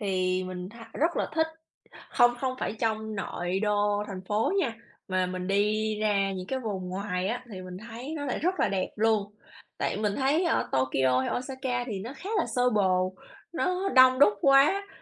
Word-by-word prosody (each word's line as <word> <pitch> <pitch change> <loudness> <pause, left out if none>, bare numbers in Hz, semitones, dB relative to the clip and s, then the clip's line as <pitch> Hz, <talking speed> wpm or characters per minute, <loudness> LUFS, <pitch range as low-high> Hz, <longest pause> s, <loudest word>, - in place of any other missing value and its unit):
thì 185 -2 0
mình 185 0 -6
tha 230 +1 -12
rất 335 +4 +1
là - - 0
thích, 320 0 +3 0.6
hông, 240 0 +4
không 260 -1 -1
phải - - -1
trong 220 -1 -1
nội 180 -1 -2
đô 205 0 +1
thành 190 -2 -6
phố 215 - +1
nha, 260 -10 0 0.4
mà 185 -1 +1
mình 180 0 -4
đi 210 +2 +1
ra 200 -2 +1
những 185 -1 -5
cái 265 +5 -2
vùng 195 -6 -4
ngoài 185 0 -2
á, 245 +3 -3
thì 185 -1 -7
mình 180 0 -8
thấy 240 +7 -7
nó 285 - -4
lại 260 - -1
rất 365 +4 0
là - - +3
đẹp 190 -1 -1
luôn. 210 -2 +1 0.5
Tại - - -1
mình 210 -1 0
thấy 285 +6 +2
ở 340 - +1
Tokyo 130 0 +2
hay 130 - -2
Osaka 255 -1 -3
thì 205 -5 -4
nó 235 +7 -6
khá 390 +8 -7
là 340 - +1
xô 250 0 +3
bồ, 185 -3 +2 0.4
nó 365 +3 0
đông 255 -5 +6
đúc 245 -7 +7
quá, 280 - +5
215 Hz, 200 wpm, -28 LUFS, 185-260 Hz, 0.6 s, đúc